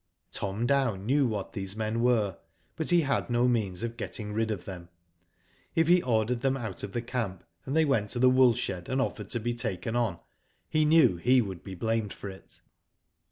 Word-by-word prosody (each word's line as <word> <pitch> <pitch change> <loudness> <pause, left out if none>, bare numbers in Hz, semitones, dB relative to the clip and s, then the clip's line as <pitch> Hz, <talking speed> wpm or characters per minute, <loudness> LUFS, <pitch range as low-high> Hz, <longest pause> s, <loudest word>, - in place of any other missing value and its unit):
Tom 100 +4 -2
Dow 135 -4 +2
knew 130 +8 +1
what 105 -4 -4
these 95 0 -4
men 110 +1 -1
were, 110 -7 +2 0.4
but 160 - -3
he 175 -1 +5
had 135 -4 -1
no 120 +1 +3
means 105 -6 0
of 115 0 -4
getting 105 -2 -5
rid 110 +1 0
of 105 -5 -4
them. 90 -3 -8 0.9
If 165 -2 +3
he 175 +1 +5
ordered 120 -1 0
them 135 0 +1
out 110 -7 -5
of 100 - -6
the 120 - -2
camp, 115 -7 -3 0.2
and 135 - -2
they 160 0 +4
went 115 -8 +1
to - - -1
the 130 +1 +5
wool 125 -2 +5
shed 90 -4 -4
and 130 - 0
offered 135 - -2
to 120 - -1
be 120 +2 -2
taken 115 -1 -3
on, 115 -8 0 0.5
he 155 0 +3
knew 155 - +5
he 125 +8 +4
would 95 -6 -3
be 95 -2 -7
blamed 110 +2 -1
for 100 - -7
it. 95 - -15
115 Hz, 205 wpm, -28 LUFS, 100-130 Hz, 0.9 s, he